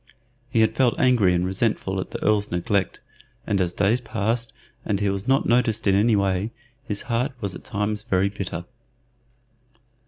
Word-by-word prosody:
He 115 -2 +2
had 110 0 +3
felt 125 -1 +2
angry 120 -8 +4
and 90 0 +1
resentful 95 0 0
at 95 - -4
the - - -6
Earl's 105 -1 +2
neglect, 95 +3 -1 0.4
and 100 -2 +1
as 90 -1 0
days 105 +6 +1
passed 115 +1 -2 0.3
and 100 - -1
he 100 -1 +1
was 100 +2 -4
not 135 +1 +3
noticed 115 -2 +2
in 100 - +4
any 105 +3 +4
way, 100 +1 0 0.3
his 105 -7 -4
heart 125 +3 -1
was 100 -5 -3
at - - -10
times 105 0 -2
very 100 -3 +1
bitter. 95 -4 -5
105 Hz, 175 wpm, -24 LUFS, 95-115 Hz, 0.4 s, angry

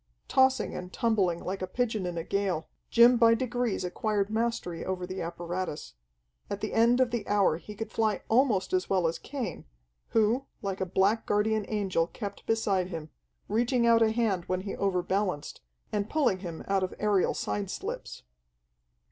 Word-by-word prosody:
Tossing 265 -3 +3
and 180 0 -6
tumbling 200 -8 +1
like 190 +1 -4
a 185 - -2
pigeon 220 -2 -1
in 175 -1 -4
a 165 - -2
gale, 190 -4 -1 0.2
Jim 240 +1 +7
by 230 -1 +6
degrees 245 -3 -1
acquired 205 +2 -1
mastery 220 -6 -1
over 185 -1 -3
the 185 0 -5
apparatus. 170 - -4 0.6
At 200 - -3
the 215 - -3
end 235 +2 +4
of 255 -2 +3
the 235 -2 -3
hour 200 -6 +3
he 210 +4 -10
could 225 +2 -5
fly 220 -2 0
almost 225 -6 +2
as 185 0 +1
well 185 -3 +2
as 165 0 0
Cain, 245 - -5 0.4
who, 230 +4 +2 0.2
like 195 -1 -3
a 190 - 0
black 195 +5 +2
guardian 210 0 +1
angel 190 -6 0
kept 200 +1 -7
beside 200 -5 +1
him, 160 -4 -7 0.4
reaching 235 +3 +2
out 230 -1 +5
a 225 - +5
hand 220 -6 0
when 185 0 -1
he 195 +1 -5
overbalanced, 185 -3 -1 0.3
and 205 0 -1
pulling 260 -12 +2
him 170 -4 -6
out 195 -1 +2
of 185 - -3
aerial 205 -3 +2
side 105 -1 -2
slips. - - -6
200 Hz, 175 wpm, -29 LUFS, 185-230 Hz, 0.6 s, Jim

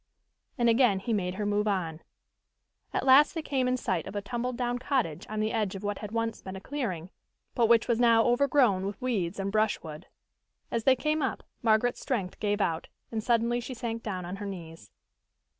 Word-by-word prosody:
And 240 -2 +2
again 230 -3 +4
he 210 +4 -2
made 180 -3 -1
her 210 +1 -2
move 205 +1 +1
on. 170 -5 -1 0.9
At - - -1
last 275 +4 +6
they 320 - -3
came 265 -4 0
in 255 0 +1
sight 185 -9 -2
of - - -8
a 205 - -1
tumbled 245 +3 -3
down 245 -1 -1
cottage 245 - -1
on 215 0 -2
the 215 +1 0
edge 210 -4 0
of 195 - -7
what 205 0 -2
had 210 -1 -7
once 230 0 -2
been 190 0 -7
a - - -6
clearing, 190 - -4 0.4
but 235 -2 +3
which 230 -1 +4
was 235 -2 +1
now 230 -2 +5
overgrown 245 -6 +3
with 200 - -6
weeds 200 -8 -1
and 195 0 -2
brushwood. 205 -8 -1 0.6
As 230 -1 -1
they 265 - +6
came 305 +3 0
up, 265 - -2 0.2
Margaret's 230 +1 +2
strength 200 -9 -2
gave 205 0 0
out, 165 -3 -1 0.2
and 220 -2 -2
suddenly 235 +1 +2
she 250 +2 -6
sank 230 -1 -4
down 185 -5 -4
on 180 +3 -5
her 205 0 -5
knees. 165 - -8
220 Hz, 205 wpm, -29 LUFS, 195-245 Hz, 0.9 s, last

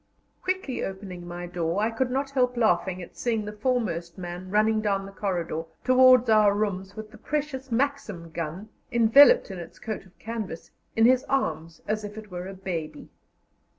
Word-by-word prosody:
Quickly 370 -8 -2
opening 190 -2 -6
my 175 0 -6
door, 175 +1 -2
I 220 +2 +1
could 245 +3 -1
not 270 +2 -1
help 250 -2 +1
laughing 185 -4 +1
at - - -13
seeing 225 -3 -1
the 210 - -6
foremost 210 -8 -1
man 180 0 -6
running 215 +2 +3
down 200 -2 0
the 195 - -9
corridor 175 -5 -2 0.2
towards 255 -1 +6
our 215 -2 +5
rooms 200 -2 -2
with 215 -1 -8
the - - -14
precious 285 -3 -3
Maxim 230 - -1
gun, 170 +6 -5 0.2
enveloped 240 - +6
in 185 - -6
its 170 -1 -10
coat 215 -3 -6
of 185 - -25
canvas, 220 -7 -6 0.2
in 225 - +5
his 255 +1 +5
arms 165 - -2
as 215 0 -1
if 205 +1 -7
it 215 -2 -10
were 180 +1 -5
a 195 - -7
baby. 175 -5 -5
210 Hz, 180 wpm, -26 LUFS, 180-245 Hz, 0.2 s, towards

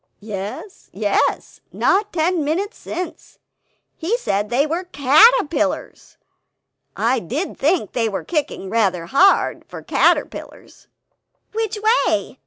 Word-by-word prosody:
"Yes, 210 - -7
yes; - - -1
not 400 +2 +1
ten 340 -1 0
minutes 375 +9 -2
since... 345 -2 -7 0.6
he 390 +9 -1
said 205 - -2
they 255 +5 +2
were 335 +4 -3
CATERPILLARS; 310 - +2 0.8
I 240 +3 +1
did 275 - -4
think 305 - 0
they 230 -3 0
were 200 - -4
kicking 300 - -3
rather 190 -7 +1
hard, 360 - +3
for - - -10
caterpillars." - - -1 0.6
"Which 445 -1 -2 0.3
way? - - -2
310 Hz, 110 wpm, -20 LUFS, 225-375 Hz, 0.8 s, hard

